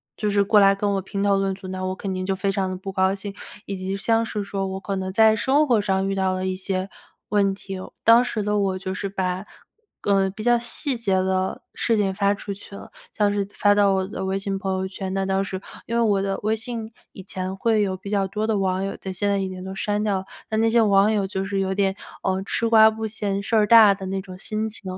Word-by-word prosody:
就 210 - -1
是 200 0 +2
过 210 +1 +5
来 195 0 +6
跟 205 +1 -1
我 195 - 0
评 195 +1 -4
头 200 -1 +3
论 195 0 0
足， 190 0 -10
那 185 0 -5
我 185 0 -1
肯 190 0 -4
定 185 0 -3
就 195 - 0
非 190 +1 -1
常 195 -1 0
地 185 - -4
不 195 +1 -7
高 190 0 +2
兴。 200 0 -6 0.3
以 200 - -4
及 190 +1 -3
像 225 +3 +2
是 210 -3 -4
说 195 -1 -3
我 190 0 -4
可 195 +1 -3
能 190 0 -3
在 220 +2 +5
生 275 +7 +2
活 235 -5 +3
上 195 -1 0
遇 195 - -1
到 190 -1 +1
了 185 0 -2
一 185 - -1
些 185 0 -3 0.4
问 200 -1 +2
题 195 0 -7
哦， 185 - -9
当 230 +2 +7
时 235 -3 -2
的 210 +1 0
我 190 -2 0
就 190 0 -4
是 200 +1 -3
把， 185 -1 -2 0.6
呃 195 -1 +2
比 200 +3 -8
较 240 0 +5
细 255 +3 -2
节 220 -5 0
的 190 0 -1
事 230 -2 +1
情 195 -2 +1
发 200 +1 +2
出 200 0 -6
去 200 +1 -13
了， 200 - -9 0.2
像 205 -1 +2
是 200 -1 0
发 205 0 +3
到 200 -1 +4
我 190 -1 0
的 190 -1 -5
微 190 +1 -1
信 195 0 -3
朋 190 0 -3
友 190 - -2
圈， 190 0 -5
那 195 0 0
当 190 0 +1
时 190 -1 -5 0.3
因 230 - -4
为 - - +3
我 205 -4 +2
的 195 0 -2
微 215 +1 +1
信 225 0 -6 0.2
以 - - -10
前 185 0 -5
会 220 +2 +2
有 190 -2 -1
比 195 +2 -9
较 200 -1 +1
多 210 +3 -2
的 220 -2 +1
网 190 -1 0
友 195 - -4
在， 190 - -6
现 195 +2 -2
在 200 0 +1
已 190 -1 -2
经 185 0 -7
都 190 0 -6
删 205 +1 -1
掉 205 -3 0
了。 190 - -9 0.2
但 220 0 0
那 225 - +3
些 230 +1 +4
网 200 -1 +4
友 205 -3 0
就 190 0 -3
是 195 0 -2
有 190 0 -1
点， 195 -1 +1 0.3
呃， 190 0 0
吃 230 +2 0
瓜 220 -1 +8
不 220 0 -4
嫌 200 -2 -3
事 225 +3 +1
儿 210 -1 +4
大 220 -2 +8
的 195 -1 -7
那 190 0 -2
种 185 -1 -10
心 215 +3 -3
情， 215 - -10
195 Hz, 290 characters per minute, -23 LUFS, 190-210 Hz, 0.6 s, 瓜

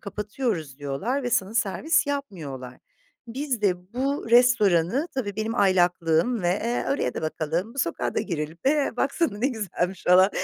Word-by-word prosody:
kapatıyoruz 205 - -3
diyorlar 170 - -2
ve 245 - -2
sana 220 -3 0
servis 290 - +1
yapmıyorlar. 155 - -5 0.5
Biz 255 -2 -3
de 180 0 0
bu 270 -2 -2
restoranı, 240 - +4
tabii 205 -7 -3
benim 220 +1 -2
aylaklığım, 180 +1 +2
ve, 175 - +2
eee, 230 +6 -1
oraya 280 - 0
da - - -4
bakalım, 165 - -2
bu - - -9
sokağa 170 - -1
da - - +1
girelim, 160 0 -4
eee, 290 0 +2
baksana 275 -5 0
ne 260 +5 +2
güzelmiş 195 -6 -3
falan 185 +3 +6
205 Hz, 155 wpm, -25 LUFS, 175-250 Hz, 0.5 s, falan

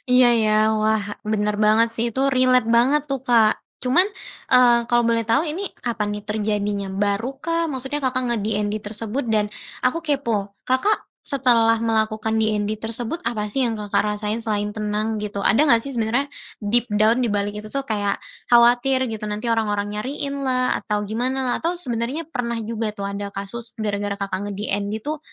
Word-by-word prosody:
Iya, 250 0 +6 0.2
ya. 215 0 +2 0.3
Wah, 215 0 +2 0.2
bener 210 -1 0
banget 215 +2 +4
sih, 230 - -1
itu 265 - -1
relate 255 -3 +3
banget 260 +5 +4
tuh, 270 -2 -1
Kak. 225 -3 +4 0.2
Cuman, 300 +10 +4 0.4
eee, 245 -2 +6
kalau 240 -1 +3
boleh 230 0 +2
tau, 230 +7 +3
ini 335 +4 -3 0.2
kapan 225 -3 -1
nih 210 - -7
terjadinya, 205 -1 -1
baru 205 +5 0
kah? 335 +1 +1
Maksudnya 265 +2 -3
Kakak 255 -1 0
nge-DND 210 -2 0
tersebut 220 +5 -4
dan 210 -1 +1 0.3
aku 255 +6 +2
kepo, 230 -9 -1
Kakak 260 +12 +1 0.2
setelah 240 -5 +3
melakukan 220 -1 0
DND 215 -1 0
tersebut, 230 +7 -4
apa 210 -3 -1
sih 260 +3 +1
yang 230 - -1
Kakak 210 -1 0 0.2
rasain 210 +1 -2
selain 210 -2 -1
tenang, 215 +1 -2
gitu? 205 -1 -4
Ada 275 +10 +4
gak 230 -2 +5
sih 275 - -5
sebenarnya 240 +5 0 0.3
deep 235 +4 +2
down 215 +3 +3
dibalik 205 -3 -1
itu 215 - -8 0.2
kayak 205 -5 -1 0.3
khawatir 245 +2 +4
gitu, 215 -1 -5
nanti 210 +3 -3
orang-orang 210 -2 0
nyariin 275 +5 -4
lah, 255 -1 +1
atau 210 -2 -2
gimana 250 +6 -1
lah, 245 -1 +1
atau 340 +2 -1
sebenarnya 260 0 -3
pernah 235 -4 -2
juga 220 -1 -3
tuh, 200 - -5
ada 200 0 -4
kasus 225 +4 -6
gara-gara 205 -2 -2
Kakak 195 -1 -3
nge-DND 205 +1 -3
tuh, 305 +1 -3
225 Hz, 170 wpm, -22 LUFS, 210-255 Hz, 0.4 s, Iya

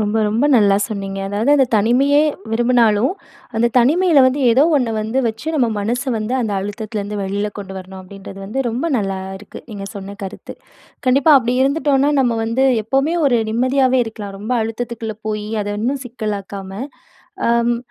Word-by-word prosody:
ரொம்ப 210 +1 0
ரொம்ப 225 +6 +1
நல்லா 205 -4 +5
சொன்னீங்க. 195 -2 -5
அதாவது 210 +7 0
அந்த 270 -2 +4
தனிமையே 255 +7 +3 0.3
விரும்புனாலும், 235 - +3 0.4
அந்த 235 +1 +3
தனிமையில 300 +3 +4
வந்து 260 +3 0
ஏதோ 255 +5 +5
1 250 -5 0
வந்து 220 +4 -2
வச்சு 230 +9 -4
நம்ம 255 -6 +2
மனச 235 +5 -1 0.2
வந்து 220 +4 -2
அந்த 220 -4 -2
அழுத்தத்திலருந்து 205 0 -4
வெளில 200 +2 -2
கொண்டு 190 -1 -7
வரணும் 190 0 -10
அப்பிடின்றது 195 +1 -11
வந்து 265 +5 -2
ரொம்ப 240 +7 -3
நல்லா 195 -2 -2 0.2
இருக்கு, 205 - -11
நீங்க 200 -2 -6
சொன்ன 200 0 -8
கருத்து. 190 - -8 0.5
கண்டிப்பா 275 +4 +5
அப்பிடி 245 -1 +1
இருந்துட்டோன்னா 280 0 +2
நம்ம 240 -3 +1
வந்து 230 +4 +1 0.2
எப்பவுமே 275 +7 +1
ஒரு 245 -4 +3
நிம்மதியாவே 255 +2 +2
இருக்கலாம். 205 -3 -7
ரொம்ப 220 +4 -3
அழுத்தத்துக்குள்ள 225 -1 -5
போய் 210 -1 -3 0.2
அத 205 0 -4
இன்னும் 270 +3 -1
சிக்கலாக்காம, 200 -4 -5 0.8
அம் 235 0 +2
225 Hz, 155 wpm, -18 LUFS, 205-260 Hz, 0.8 s, நல்லா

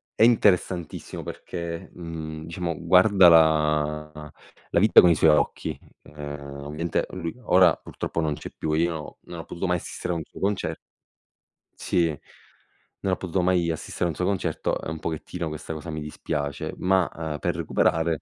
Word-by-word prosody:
è - - +4
interessantissimo 95 -7 +2
perché, 85 -1 -6
mhmm, 80 -2 -7
diciamo 85 -1 -3
guarda 90 +2 +6
la 75 -1 +2 0.4
la - - +2
vita - - +8
con 90 - +6
i 85 - +5
suoi 80 +2 +5
occhi. 75 - 0 0.3
Uhm, 75 -1 -8
ovviamente 75 +3 -2
lui 85 +1 -5
ora 90 -5 +5
purtroppo 85 - -4
non 75 -2 0
c'è - - -8
più, 80 - -2
io 80 -1 -1
non 85 - -9
ho 80 - -7
potuto 85 +2 -4
mai 90 0 +2
assistere 90 - -5
a - - -2
un 80 - -4
suo - - -14
conce 100 0 -1 1.0
Sì, 85 -1 +2 0.9
non 95 - 0
ho - - 0
potuto 95 0 -1
mai 90 -2 +2
assistere 80 +2 -3
a - - +2
un 80 - -4
suo 90 - -1
concerto 100 0 -1
e - - -5
un 80 -1 -5
pochettino 85 +2 -4
questa 75 +1 -6
cosa 80 +2 -7
mi 80 -1 -4
dispiace, 75 -1 -4
ma, 95 -1 +2
uhm, 80 -2 -4
per - - -1
recuperare 80 -1 +1
80 Hz, 170 wpm, -25 LUFS, 75-90 Hz, 1.0 s, vita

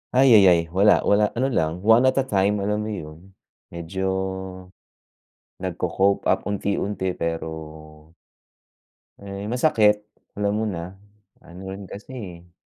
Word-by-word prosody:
Ayayay, 100 -10 +6
wala, 100 +2 +5
wala, 105 +1 +3
ano 130 - +2
lang, 85 -10 -1
one 115 +2 +6
at 130 +1 +3
a 135 - -1
time 100 -1 +1
alam 105 +2 -1
mo 110 - -4
'yun, 85 -1 -9 0.4
medyo, 85 +3 -5 1.6
nagko-cope 95 +2 0
up - - 0
unti-unti 100 -1 -2
pero 80 -1 -6 1.1
Eh, 100 0 -7
masakit, 110 -6 +3 0.3
alam 100 0 +1
mo 110 - -1
na, 90 -3 -5 0.5
ano 90 +2 -12
rin 100 +1 -8
kasi 105 +6 -10
eh. 90 -7 -9
100 Hz, 125 wpm, -23 LUFS, 85-105 Hz, 1.6 s, Ayayay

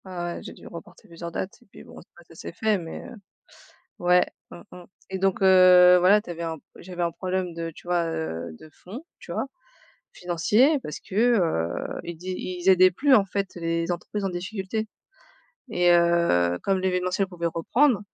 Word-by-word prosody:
Ouais, 190 - -10
ouais, 175 -1 -4
j'ai - - -9
dû - - -16
reporter 170 -1 -12
plusieurs 170 0 -8
dates 185 +3 -5
et - - -23
puis - - -14
bon - - -13
ça 175 - -20
ça - - -16
s'est 160 - -8
fait 215 +2 0
mais 165 -2 -8
heu - - -10 0.9
ouais. 180 0 +3 0.2
Mmh - - -11
mh 180 -1 -11 0.3
et 190 - -3
donc 195 0 0
heu, 180 -1 +7
voilà 195 +4 +4
tu 180 - -10
avais 170 0 -6
un 165 -1 -3
p - - -26
j'avais 180 -1 -7
un 170 - +1
problème 185 0 -3
de, 165 0 -5
tu - - -15
vois, 175 -1 +1
heu, 85 - -5
de 155 - -15
fond, 215 - -11
tu - - -13
vois? - - -1 0.7
Financier, 210 - +2
parce 150 - -7
que, - - -12 0.3
heu, 85 - -2
ils 170 - -6
di 185 +3 -6
ils 180 0 -4
aidaient 185 0 +6
plus 275 +8 +3
en 210 - +5
fait 195 0 -4
les 165 0 -2
entreprises 185 +4 -4
en - - 0
difficulté 190 +4 -4 0.8
et 175 -4 +3
heu, 170 - +3
comme 195 -1 +1
l'événementiel 185 +1 0
pouvait 175 -2 -5
reprendre. 210 - +2
180 Hz, 195 wpm, -25 LUFS, 170-190 Hz, 0.9 s, heu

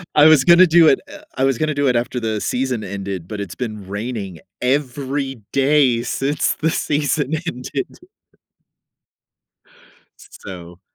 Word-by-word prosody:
I 150 - +7
was 155 -4 +7
gonna 175 +3 +7
do 165 0 +6
it 135 - +4
Eh, - - -12 0.2
I 130 - +1
was 135 -3 +2
gonna 155 -1 0
do 145 -1 0
it 125 - +2
after 120 +1 -1
the 110 -2 -2
season 125 -3 -2
ended, 95 -3 -5
but 105 +1 -6
it's 90 -3 -7
been 110 -6 -6
raining 100 -4 -5 0.2
every 135 -1 -2
day 135 -4 +3
since 140 +2 -1
the 160 - +2
season 145 -1 -1
ended. 125 0 -5 2.2
So 90 - -11
130 Hz, 145 wpm, -20 LUFS, 110-145 Hz, 2.2 s, I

